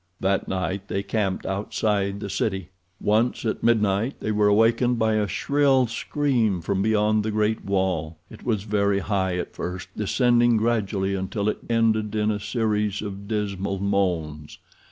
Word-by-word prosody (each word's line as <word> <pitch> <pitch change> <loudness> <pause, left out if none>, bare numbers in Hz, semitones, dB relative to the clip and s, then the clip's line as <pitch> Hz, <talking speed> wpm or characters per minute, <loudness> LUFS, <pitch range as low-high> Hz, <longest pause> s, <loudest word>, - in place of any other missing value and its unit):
That 95 0 0
night 95 +1 -3
they 100 - -2
camped 100 -2 -1
outside 100 0 -1
the 100 - -4
city. 95 -5 -2 0.3
Once, 110 +4 +1
at 110 - -1
midnight, 110 +1 +2
they 110 - -2
were 105 0 +3
awakened 115 +4 +3
by 110 -1 +2
a 105 -1 +1
shrill 135 - +2
scream 115 -4 0
from 95 +3 -1
beyond 110 0 +2
the 110 - -2
great 110 +1 0
wall. 90 -5 -1
It - - -13
was 110 -5 -1
very 100 -1 +1
high 95 -2 -1
at 90 - -4
first, 90 +1 -5
descending 120 +2 +3
gradually 105 -4 0
until 95 +2 -2
it - - -3
ended 110 -2 +1
in 105 0 +1
a 105 - -2
series 105 -1 -1
of 100 -1 -7
dismal 100 -2 -2
moans. 90 -7 -1
105 Hz, 155 wpm, -24 LUFS, 95-110 Hz, 0.3 s, were